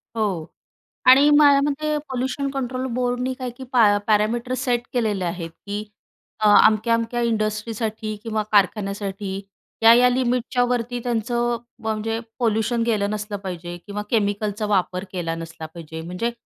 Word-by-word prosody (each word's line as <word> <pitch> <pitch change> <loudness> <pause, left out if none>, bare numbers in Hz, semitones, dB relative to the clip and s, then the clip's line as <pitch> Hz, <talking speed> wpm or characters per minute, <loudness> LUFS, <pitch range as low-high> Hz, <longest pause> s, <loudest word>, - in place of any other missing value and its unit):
हो 195 -8 -1 0.6
आणि 275 +3 +8
माझ्या 290 -1 +6
मते 305 +1 -1
पोल्यूशन 265 +2 -2
कंट्रोल 260 -1 -3
बोर्डनी 250 +1 -1
काय 255 -1 -5
की 265 - -8
पॅ 215 -5 +5
पॅरामीटर 225 +4 +1
सेट 250 -2 0
केलेले 210 -6 0
आहेत 170 -1 -4 0.2
की 205 +1 -3 0.6
अ, 215 - +3 0.2
अमक्या-अमक्या 230 +2 +2
इंडस्ट्रीसाठी 215 0 -2
किंवा 220 -2 -1
कारखान्यासाठी 200 -1 0 0.5
या-या 235 +2 +7
लिमिटच्यावरती 245 -1 0
त्यांचं 240 0 0 0.3
म्हणजे 220 +1 -2 0.2
पोल्यूशन 225 0 +1
गेलं 210 -3 +1
नसलं 210 -1 -4
पाहिजे 175 -1 -6
किंवा 205 0 -4
केमिकलचा 210 -1 0
वापर 185 -3 0
केला 170 -3 -3
नसला 165 -1 -8
पाहिजे. 160 0 -8
म्हणजे 180 +8 -3
220 Hz, 130 wpm, -22 LUFS, 205-245 Hz, 0.6 s, आणि